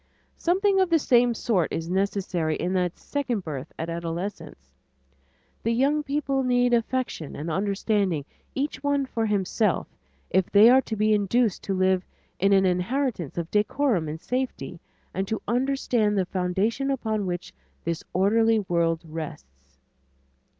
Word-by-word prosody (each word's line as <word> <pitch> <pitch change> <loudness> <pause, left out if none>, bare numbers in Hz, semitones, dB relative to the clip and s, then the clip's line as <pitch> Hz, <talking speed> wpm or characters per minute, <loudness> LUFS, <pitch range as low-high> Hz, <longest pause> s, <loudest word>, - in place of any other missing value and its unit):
Something 385 +3 +2
of 375 -2 +3
the 335 - +5
same 245 -5 +3
sort 195 -8 0
is 165 0 -3
necessary 185 -4 0
in 180 +4 -2
that 180 -2 0
second 255 -7 -2
birth 150 -3 -6
at 160 - -3
adolescence. 165 - -5 0.9
The 230 - 0
young 280 +5 +2
people 280 -2 -1
need 245 -1 +2
affection 235 - -1
and 160 +3 -4
understanding 195 -4 0 0.3
each 270 -1 -2
one 285 -1 +1
for 225 -3 -2
himself, 205 0 +1 0.5
if 185 0 +2
they 210 +4 +7
are 260 +1 +6
to 225 - -4
be 215 +1 +2
induced 210 +1 +1
to 195 - -1
live 185 0 +2 0.4
in 195 +1 +3
an 195 -1 +5
inheritance 185 - -1
of 170 -1 -3
decorum 210 - +1
and 155 +2 -5
safety 250 -6 -3 0.3
and 190 +1 -2
to 220 - -2
understand 240 -3 +1
the 190 - +2
foundations 195 +9 -1
upon 220 -7 -1
which 175 0 -4 0.3
this 170 -1 -3
orderly 225 +4 +3
world 170 -4 0
rests. 70 - -9
205 Hz, 145 wpm, -25 LUFS, 175-245 Hz, 0.9 s, they